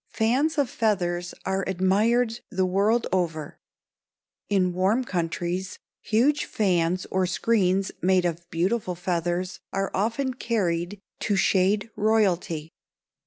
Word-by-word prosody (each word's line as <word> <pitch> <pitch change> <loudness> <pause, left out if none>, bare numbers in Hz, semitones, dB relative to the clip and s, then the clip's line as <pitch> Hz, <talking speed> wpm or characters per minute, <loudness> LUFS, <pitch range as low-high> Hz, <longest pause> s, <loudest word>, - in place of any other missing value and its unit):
Fans 265 +8 +1
of 285 -3 +2
feathers 175 -6 -1
are 190 0 0
admired 220 +6 +2
the 190 0 0
world 205 +6 +2
over. 165 -3 -2 0.9
In 185 -3 +2
warm 195 +8 +2
countries 175 -1 -3 0.2
huge 265 +7 +2
fans 180 -3 0
or 185 -1 +1
screens 190 -1 +1
made 185 -1 +3
of 170 0 -3
beautiful 180 +3 -1
feathers 175 +1 -2
are 195 0 -1
often 230 +7 0
carried 195 -6 -1 0.2
to 205 - 0
shade 195 +3 +2
royalty. 185 -7 +1
190 Hz, 115 wpm, -25 LUFS, 175-220 Hz, 0.9 s, made